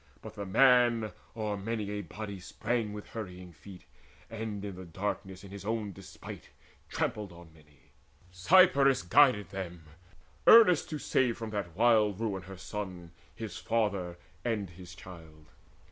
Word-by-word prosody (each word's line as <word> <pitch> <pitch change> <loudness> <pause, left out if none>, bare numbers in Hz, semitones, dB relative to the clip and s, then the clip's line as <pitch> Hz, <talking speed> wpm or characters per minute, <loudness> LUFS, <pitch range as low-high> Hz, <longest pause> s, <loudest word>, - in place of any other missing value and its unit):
But - - -8
the 100 -1 -6
man 120 0 +4 0.3
O'er 105 -2 -2
many 105 0 -3
a 105 0 -3
body 100 -1 -7
sprang 115 +4 -2
with 105 0 -8
hurrying 90 -5 -8
feet, 90 +5 -13 0.5
And 110 -2 -5
in 100 -2 -6
the 95 - -9
darkness 95 +2 -5
in 100 - -11
his 100 -1 -8
own 110 -1 -2
despite - - -11 0.4
Trampled 105 -3 -2
on 85 -1 -14
many. 75 -3 -23 0.4
Cypris 140 - +5
guided 105 -1 +4
them, 90 -4 -6 0.6
Earnest 215 -9 +7
to 155 - -3
save 125 -4 +1
from 115 -2 -6
that 100 -6 -4
wild 110 -4 +3
ruin 105 -4 -2
her 95 +1 -10
son, 90 -4 -6 0.2
His 110 -5 -6
father, 100 -6 -1 0.3
and 105 -6 -2
his 90 0 -12
child. 80 -4 -13
100 Hz, 145 wpm, -30 LUFS, 90-115 Hz, 0.6 s, Earnest